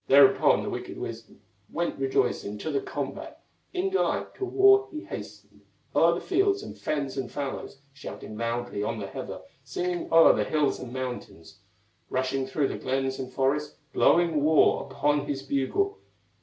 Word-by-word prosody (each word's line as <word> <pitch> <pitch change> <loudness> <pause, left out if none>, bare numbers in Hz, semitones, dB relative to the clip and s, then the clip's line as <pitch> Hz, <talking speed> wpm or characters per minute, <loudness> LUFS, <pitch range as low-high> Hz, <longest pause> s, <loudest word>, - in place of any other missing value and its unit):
Thereupon 140 0 +6
the - - -3
wicked - - -6
wizard - - -7 0.3
Went 170 -4 -2
rejoicing 130 -6 0
to 155 +9 -4
the 140 - 0
combat; - - -5 0.3
In 380 +1 -1
delight 385 - 0
to 390 - -4
war 400 +1 +5
he 310 -4 -6
hastened - - -9 0.3
O'er - - +5
the - - -3
fields, 390 +2 +1
and - - -8
fens, 140 -3 -3
and 130 -3 -3
fallows, 140 -1 -5 0.2
Shouting 135 -5 -8
loudly 115 -1 -2
on 115 +2 -2
the 105 - -4
heather, - - -7 0.2
Singing 175 -1 -3
o'er 165 0 +8
the - - +1
hills 150 -2 +1
and 125 -2 -7
mountains, 125 -10 -6 0.5
Rushing 130 +1 -1
through 135 +1 0
the - - -5
glens 135 0 -1
and 130 -1 -5
forests, 140 +3 0 0.2
Blowing 165 -4 +3
war 155 -2 +4
upon 145 +1 +1
his 135 -1 -3
bugle. 140 - 0
140 Hz, 160 wpm, -27 LUFS, 130-170 Hz, 0.5 s, o'er